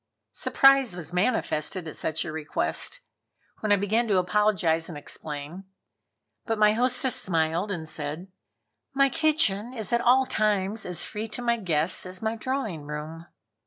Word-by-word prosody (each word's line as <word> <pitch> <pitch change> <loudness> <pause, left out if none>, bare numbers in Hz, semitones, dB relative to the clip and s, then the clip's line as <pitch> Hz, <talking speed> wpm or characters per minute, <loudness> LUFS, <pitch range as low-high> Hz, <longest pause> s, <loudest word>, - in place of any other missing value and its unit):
Surprise 270 -7 +4
was 175 -1 -7
manifested 180 -4 0
at 155 - -7
such 160 +2 -2
a 170 - -4
request, 160 - -2 0.6
when 215 - -1
I - - +7
began 215 +4 +1
to 200 -3 +2
apologize 180 -4 +2
and 160 - -7
explain. 150 +5 -7 0.8
But 225 -1 0
my 210 0 +5
hostess 250 +2 +1
smiled 165 +2 0
and 165 -4 -4
said: 155 +5 -5 0.6
"My 275 0 +4
kitchen 255 -7 +2
is 220 -2 -3
at 235 - +3
all 255 +2 +5
times 210 -2 0
as 180 -1 -1
free 215 +1 -5
to 235 +3 -6
my 235 0 +2
guests 170 -3 0
as 185 0 -6
my 220 0 -2
drawing 230 - -3
room." 155 +3 -7
195 Hz, 155 wpm, -26 LUFS, 165-230 Hz, 0.8 s, I